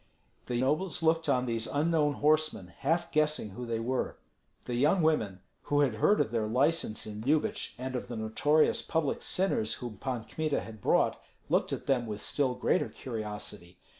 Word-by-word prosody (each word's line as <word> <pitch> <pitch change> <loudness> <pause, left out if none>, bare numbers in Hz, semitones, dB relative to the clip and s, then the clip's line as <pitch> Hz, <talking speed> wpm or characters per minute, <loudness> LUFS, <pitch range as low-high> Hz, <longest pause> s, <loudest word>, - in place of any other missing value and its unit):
The 120 -1 -1
nobles 155 +7 0
looked 160 -1 +2
on 125 -2 +2
these 115 -2 -1
unknown 150 0 +2
horsemen, 150 - +1
half 170 +4 0
guessing 150 -8 +1
who 120 +5 -6
they 115 -1 -1
were. 125 +3 -2 0.5
The 125 - -4
young 150 +8 +3
women, 110 - +1 0.2
who 145 0 +2
had 135 -5 +3
heard 200 - +3
of 110 - +1
their 115 -2 0
license 130 0 +1
in 105 0 -6
Lyubich 150 +6 0
and 130 +1 -4
of 125 - -3
the 120 - -5
notorious 115 +8 +2
public 160 -4 -1
sinners 180 - 0
whom 120 -5 -7
Pan 125 -4 -3
Kmita 150 +7 -1
had 110 -2 -10
brought, - - +2 0.3
looked - - +2
at - - -4
them 125 -4 +1
with 105 -1 -4
still 130 0 0
greater - - +1
curiosity. 105 -6 -6
130 Hz, 175 wpm, -30 LUFS, 110-155 Hz, 0.5 s, young